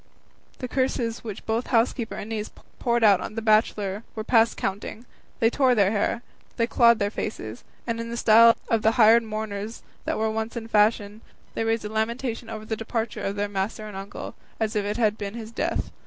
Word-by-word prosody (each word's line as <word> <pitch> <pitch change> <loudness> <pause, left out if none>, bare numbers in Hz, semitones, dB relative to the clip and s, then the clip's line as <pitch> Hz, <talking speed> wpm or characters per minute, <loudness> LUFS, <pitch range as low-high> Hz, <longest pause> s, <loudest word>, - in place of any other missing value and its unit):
The 255 - -5
curses 245 -3 -1
which 215 -4 -7
both 225 +2 -1
housekeeper 230 -1 +1
and 205 - -6
niece 215 -1 -3 0.3
poured 235 -1 +1
out 200 -4 +6
on - - -6
the 225 - -2
bachelor 215 -2 +2
were 220 - -3
past 230 0 +3
counting; 205 +4 -4 0.3
they 225 0 +3
tore 260 -2 +3
their 200 -3 +3
hair, 220 +2 0 0.3
they 230 - +3
clawed 235 -1 +5
their 205 -1 -1
faces, 110 - -5 0.2
and 230 -1 -2
in 230 0 -4
the 235 - -4
style 230 +1 +7
of 225 -1 +1
the 220 +1 +3
hired 230 0 +6
mourners 215 0 -5 0.2
that - - -1
were 220 0 0
once 220 +2 -3
in 225 -1 -5
fashion, 210 -1 +2 0.3
they - - -1
raised 225 -1 0
a - - -3
lamentation 230 +2 -2
over 215 -1 -6
the 220 - -2
departure 225 0 -3
of 195 - -2
their 205 0 -1
master 205 +2 -3
and 210 - -9
uncle, 195 +1 -7 0.3
as 220 0 -1
if 205 -1 0
it 210 +2 -2
had 215 -3 +1
been 200 +1 -5
his 225 -1 -7
death. - - -2
220 Hz, 205 wpm, -25 LUFS, 210-230 Hz, 0.3 s, style